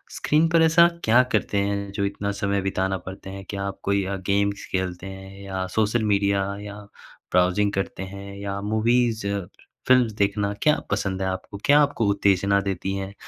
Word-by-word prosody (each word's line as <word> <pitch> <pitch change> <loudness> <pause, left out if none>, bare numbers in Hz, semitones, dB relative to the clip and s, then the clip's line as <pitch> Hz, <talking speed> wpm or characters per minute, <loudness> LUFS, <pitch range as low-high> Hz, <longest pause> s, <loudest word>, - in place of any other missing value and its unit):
Screen 155 +2 +2
पर 165 0 +4
ऐसा 165 +1 +6 0.2
क्या 120 +3 +5
करते 105 -1 0
हैं 100 0 -1
जो 100 0 -1
इतना 100 0 -2
समय 100 -1 -1
बिताना 95 0 -1
पड़ते 95 0 -8
हैं? 95 0 -8
क्या 100 -1 -4
आप 100 -1 -5
कोई 100 0 +1
अ, 100 +1 -2
गेम्स 100 +1 -1
खेलते 95 0 -2
हैं 95 +1 -10
या 95 -1 -3
सोशल 110 +1 +2
मीडिया 100 -1 +2 0.2
या 105 0 -8 0.6
ब्राउजिंग 90 +3 +3
करते 95 0 -3
हैं 100 +1 -8
या 100 0 -4
मूवीज़ 110 0 +1 0.6
फ़िल्मस 125 -3 +5
देखना 100 0 0
क्या 150 0 +3
पसंद 95 -1 -1
है 95 - 0
आपको? 95 +2 -5
क्या 145 +1 +6
आपको 140 -7 +1
उत्तेजना 100 0 +2
देती 95 0 -3
हैं? 95 0 -5
100 Hz, 175 wpm, -24 LUFS, 95-105 Hz, 0.6 s, ऐसा